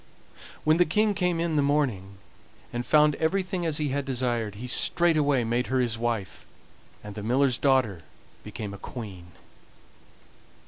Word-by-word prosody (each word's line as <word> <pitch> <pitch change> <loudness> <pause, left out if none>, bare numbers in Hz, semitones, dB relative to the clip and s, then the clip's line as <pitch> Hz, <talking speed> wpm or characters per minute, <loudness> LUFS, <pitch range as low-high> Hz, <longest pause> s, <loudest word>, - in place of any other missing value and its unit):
When 155 +1 +3
the 175 - +4
King 210 +5 +2
came 180 -3 0
in 165 -2 0
the - - +4
morning, 125 -10 -1 0.6
and 120 0 -2
found 150 -1 +5
everything 180 +1 -1
as 155 -2 0
he 150 -2 -1
had 140 +1 -1
desired, 120 -5 -2
he 115 +5 -7
straightway 145 0 +3
made 120 +2 -1
her 130 - 0
his 120 -3 +1
wife, 115 -4 -3 0.6
and 105 -1 -8
the 105 - -7
miller's 125 +3 +1
daughter 130 - +2 0.4
became 105 -2 -6
a 100 - -9
queen. 100 -8 -8
130 Hz, 150 wpm, -26 LUFS, 115-155 Hz, 0.6 s, found